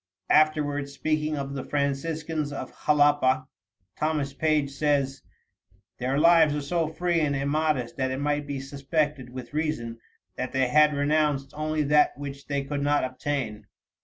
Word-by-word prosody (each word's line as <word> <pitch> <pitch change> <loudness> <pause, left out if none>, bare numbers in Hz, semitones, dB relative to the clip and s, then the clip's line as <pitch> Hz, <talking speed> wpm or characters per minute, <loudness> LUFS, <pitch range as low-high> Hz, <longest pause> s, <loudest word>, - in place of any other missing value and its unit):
Afterward, 150 -2 +2
speaking 155 +1 -1
of 140 0 -4
the 135 -2 -4
Franciscans 150 +2 -2
of 140 - -6
Jalapa, 145 -3 +4 0.5
Thomas 150 -3 -1
Page 150 -1 +1
says: 140 -1 0 0.8
"Their 130 +3 0
lives 160 -1 +5
are 150 - -2
so 165 +3 0
free 170 +2 0
and 145 -3 +1
immodest 150 0 0
that 130 -1 0
it 130 +1 -3
might 145 0 -1
be 140 -1 -3
suspected 140 0 -2
with 125 +1 -9
reason 150 -7 -2 0.4
that 130 0 -4
they 130 -1 +2
had 150 +2 +5
renounced 145 -1 +1
only 155 0 -1
that 150 0 +3
which 140 0 -7
they 140 -1 -1
could 140 +1 -3
not 145 +1 +2
obtain." 130 -4 -3
145 Hz, 150 wpm, -26 LUFS, 135-155 Hz, 0.8 s, lives